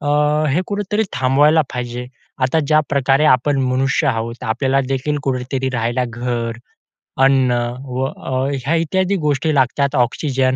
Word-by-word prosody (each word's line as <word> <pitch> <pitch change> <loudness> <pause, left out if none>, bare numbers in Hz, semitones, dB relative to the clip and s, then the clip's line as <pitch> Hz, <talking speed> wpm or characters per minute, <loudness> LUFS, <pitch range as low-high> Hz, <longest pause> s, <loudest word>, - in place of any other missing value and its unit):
अ, 145 - -3 0.5
हे 175 - +2
कुठेतरी 205 +1 -1
थांबवायला 145 +5 +3
पाहिजे. 125 0 -4 0.4
आता 135 +5 +2
ज्याप्रकारे 140 -2 +2
आपण 135 +3 +2
मनुष्य 130 +1 +1
आहोत, 115 +2 -2
आपल्याला 130 +4 +1
देखील 135 +2 -1
कुठेतरी 130 0 -2
राहायला 120 +1 0
घर, 120 -1 -3 0.7
अन्न 135 -2 +4 0.3
व 130 0 -2
अ, 135 0 -3 0.2
ह्या 165 - +1
इत्यादी 190 +4 0
गोष्टी 150 +2 +1
लागतात. 140 +2 +1
ऑक्सिजन, 130 +1 +1
135 Hz, 130 wpm, -18 LUFS, 125-145 Hz, 0.7 s, अन्न